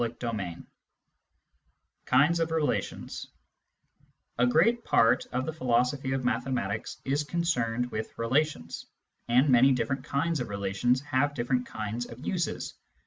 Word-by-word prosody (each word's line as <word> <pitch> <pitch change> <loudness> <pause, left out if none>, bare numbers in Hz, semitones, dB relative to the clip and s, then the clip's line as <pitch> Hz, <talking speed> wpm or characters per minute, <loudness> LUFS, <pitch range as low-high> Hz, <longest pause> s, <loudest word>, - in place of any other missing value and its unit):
CHAPTER 120 0 -3
V 90 -6 -4 1.5
KINDS 150 +7 +4
OF 165 0 +1
RELATIONS 160 -2 -2 1.1
A 125 - +5
great 210 - +3
part 115 +1 +3
of 130 +1 -1
the 160 - -3
philosophy 130 0 +1
of 130 -2 -2
mathematics 115 -4 -1
is 140 +2 +1
concerned 125 -8 -1
with 110 0 -5
relations, 115 - -1 0.4
and 125 +4 +4
many 130 +1 +6
different 130 +2 -1
kinds 150 +3 0
of 125 - -3
relations 100 +6 0
have 145 0 0
different 125 0 0
kinds 110 +3 -4
of 120 +4 -10
uses. 175 -4 -2
125 Hz, 130 wpm, -28 LUFS, 115-145 Hz, 1.5 s, many